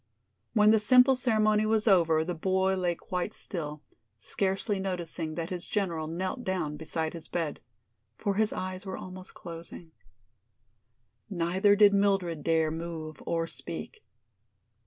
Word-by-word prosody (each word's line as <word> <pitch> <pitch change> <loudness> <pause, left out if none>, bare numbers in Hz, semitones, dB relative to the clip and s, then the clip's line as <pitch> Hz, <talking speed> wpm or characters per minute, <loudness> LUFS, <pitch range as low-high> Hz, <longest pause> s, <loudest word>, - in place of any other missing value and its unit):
When 210 -2 +6
the 220 - +5
simple 255 +4 +6
ceremony 215 -4 +2
was 220 0 +1
over 165 -5 +4
the 175 +2 -3
boy 190 +3 +1
lay 180 -2 0
quite 180 +5 -3
still, 150 -4 -4 0.3
scarcely 195 +1 -1
noticing 170 -4 -3
that 170 +1 -4
his 180 -1 -4
general 170 -7 -1
knelt 185 +9 -3
down 175 -7 -2
beside 160 +1 -3
his 165 -2 -9
bed. 165 -4 -2 0.6
For 200 - -1
his 215 +1 +1
eyes 185 0 -4
were 190 -1 -5
almost 185 0 -10
closing. 165 0 -9 1.4
Neither 190 +3 +3
did 205 -1 +6
Mildred 195 -5 +1
dare 160 -1 +2
move 160 -1 -6
or 165 -1 0
speak. 430 - -6
185 Hz, 135 wpm, -29 LUFS, 165-205 Hz, 1.4 s, When